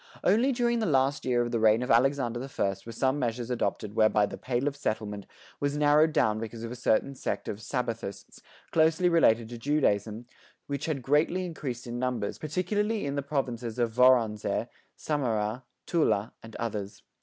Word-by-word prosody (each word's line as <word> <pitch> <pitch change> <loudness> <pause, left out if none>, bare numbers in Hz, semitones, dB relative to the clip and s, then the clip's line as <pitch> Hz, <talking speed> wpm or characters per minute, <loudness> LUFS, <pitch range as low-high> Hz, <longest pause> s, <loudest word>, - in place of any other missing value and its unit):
Only 230 +8 +3
during 240 -2 +1
the 220 - 0
last 135 -2 +1
year 120 -2 +2
of 120 - -4
the 115 - 0
reign 110 +2 +4
of 125 - -1
Alexander 120 -1 +2
the 135 +2 -6
First 95 -4 -2
were - - -5
some 130 +5 0
measures 120 -1 -2
adopted 110 -3 -2
whereby 110 -1 +4
the - - -7
"Pale 125 +2 -2
of 140 - -1
Settlement" 110 -6 -3 0.3
was 145 0 -1
narrowed 150 +2 +4
down 110 -6 +2
because 115 +1 -6
of 115 - -5
a - - -5
certain 125 +2 +1
sect 135 - -4
of 100 - -3
"Sabbathists," 115 -4 -5 0.3
closely 165 +2 +3
related 115 -9 +4
to 120 -1 -8
Judaism, 115 -5 0 0.4
which 140 +1 -4
had 140 -5 -2
greatly 155 +7 +2
increased 135 -8 -5
in 120 0 -5
numbers, 125 -5 -2
particularly 205 +7 -1
in 140 - -2
the 140 - -1
provinces 125 -5 -3
of 120 -2 +1
Voronezh, 120 -4 +3 0.3
Samara, 120 -5 -2 0.2
Tula, 115 - +1
and 115 -1 -12
others. 105 -4 -5
125 Hz, 180 wpm, -28 LUFS, 115-145 Hz, 0.4 s, reign